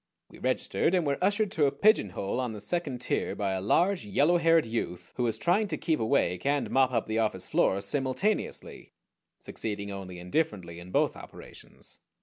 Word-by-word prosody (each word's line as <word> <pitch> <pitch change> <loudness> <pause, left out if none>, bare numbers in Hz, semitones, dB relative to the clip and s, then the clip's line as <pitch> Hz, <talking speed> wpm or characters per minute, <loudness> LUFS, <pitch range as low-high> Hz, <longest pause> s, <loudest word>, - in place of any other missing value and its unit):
We - - -14
registered, 180 - 0
and 175 -3 +1
were 140 +4 -1
ushered 205 +1 +2
to 150 -6 +3
a - - +1
pigeonhole 130 - +1
on 125 -3 -2
the 105 - -7
second 135 - -3
tier - - -1
by 100 -2 -1
a 95 -1 -2
large, 175 - +2
yellow 175 -4 +3
haired 165 -1 +4
youth, 90 -6 -4
who - - -3
was 115 -2 0
trying 200 +5 +2
to - - -3
keep 160 -3 0
awake 110 -6 +1
and 145 0 0
mop 130 -1 +3
up 115 -3 0
the 110 +1 -1
office 110 -1 -1
floor 95 - +2
simultaneously, 145 - -2 0.5
succeeding 100 -2 -5
only 95 -2 -7
indifferently 90 - -2
in 85 +1 -11
both - - +1
operations. - - -12
130 Hz, 180 wpm, -28 LUFS, 100-165 Hz, 0.5 s, haired